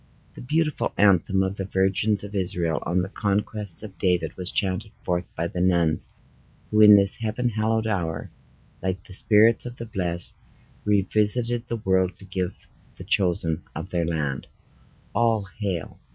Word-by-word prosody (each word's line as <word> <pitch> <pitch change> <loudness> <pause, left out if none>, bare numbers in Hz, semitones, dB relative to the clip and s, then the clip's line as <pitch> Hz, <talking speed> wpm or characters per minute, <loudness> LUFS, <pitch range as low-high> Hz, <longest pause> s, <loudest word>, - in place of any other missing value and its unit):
The - - -11
beautiful 150 +4 -1
anthem 95 -1 +3
of 95 +1 -3
the 95 - -3
virgins 95 +2 0
of 105 0 -8
Israel 90 -4 -1
on 90 +1 +1
the - - -4
conquests 105 -1 -1
of 100 -3 -10
David, 90 -4 0
was 90 -1 -1
chanted 95 +1 -1
forth 90 -1 -1
by 85 - -1
the 90 +1 -4
nuns 85 -4 +1 0.6
who 105 0 +4
in 105 -1 +10
this 100 -1 +3
heaven 115 +2 -1
hallowed 110 0 0
hour, 85 -7 -2 0.5
like 95 0 -3
the 95 - -9
spirits 110 +3 +5
of 120 - -8
the 115 - -7
blest, 90 -5 +1 0.5
revisited 110 +4 +1
the 115 - -2
world 95 -4 0
to 100 - -14
give 95 -2 -5 0.3
the - - -8
chosen 90 -5 +1
of - - -6
their 85 -2 0
land, 75 -5 -2 0.7
"All 115 -4 +1
hail." 95 -6 -4
95 Hz, 160 wpm, -24 LUFS, 90-110 Hz, 0.7 s, in